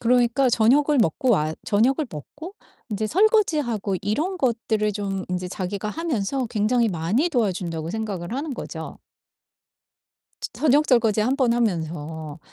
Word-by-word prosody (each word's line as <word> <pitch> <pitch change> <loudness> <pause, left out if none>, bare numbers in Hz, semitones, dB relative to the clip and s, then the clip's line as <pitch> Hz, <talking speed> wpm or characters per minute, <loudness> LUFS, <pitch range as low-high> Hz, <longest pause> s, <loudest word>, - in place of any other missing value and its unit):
그러니까 245 +2 +3
저녁을 275 +6 +3
먹고 225 - +1
와 155 -7 +2
저녁을 255 +8 +2
먹고 305 - -9 0.4
인제 215 +1 -1
설거지하고 305 - +2
이런 300 - -1
것들을 225 -5 0
좀 195 -2 -3
인제 180 0 -3
자기가 195 +3 -4
하면서 265 -3 -2
굉장히 230 +2 +1
많이 195 - 0
도와준다고 180 - -1
생각을 205 -3 -4
하는 290 +2 -3
거죠. - - -7 1.4
저 - - -3
저녁 300 0 +3
설거지 225 -4 +3
1 255 +5 +1
번 255 -4 +2
하면서. 160 -8 -2
220 Hz, 300 characters per minute, -23 LUFS, 190-265 Hz, 1.4 s, 그러니까